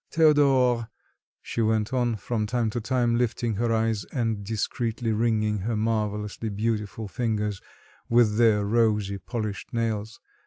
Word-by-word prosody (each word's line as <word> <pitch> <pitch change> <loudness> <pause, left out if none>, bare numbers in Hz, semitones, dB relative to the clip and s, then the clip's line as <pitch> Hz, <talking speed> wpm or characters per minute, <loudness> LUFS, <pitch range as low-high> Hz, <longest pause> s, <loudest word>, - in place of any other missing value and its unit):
"Théodore!" 135 -7 +4 0.6
she 115 - -3
went 110 +1 +1
on, 120 -3 +1
from 110 +1 -2
time 115 -1 0
to 120 - -3
time 120 0 +1
lifting 120 -1 0
her 115 +1 0
eyes 110 -2 +1
and 115 -5 -2
discreetly 115 +2 -2
wringing 110 -1 +1
her 110 +4 -2
marvellously 105 0 -2
beautiful 105 0 -2
fingers 105 -3 -2 0.5
with 115 -2 +4
their 110 -3 +4
rosy, 105 -3 +1
polished 110 -1 -5
nails. 115 -2 -2
110 Hz, 130 wpm, -26 LUFS, 105-120 Hz, 0.6 s, Théodore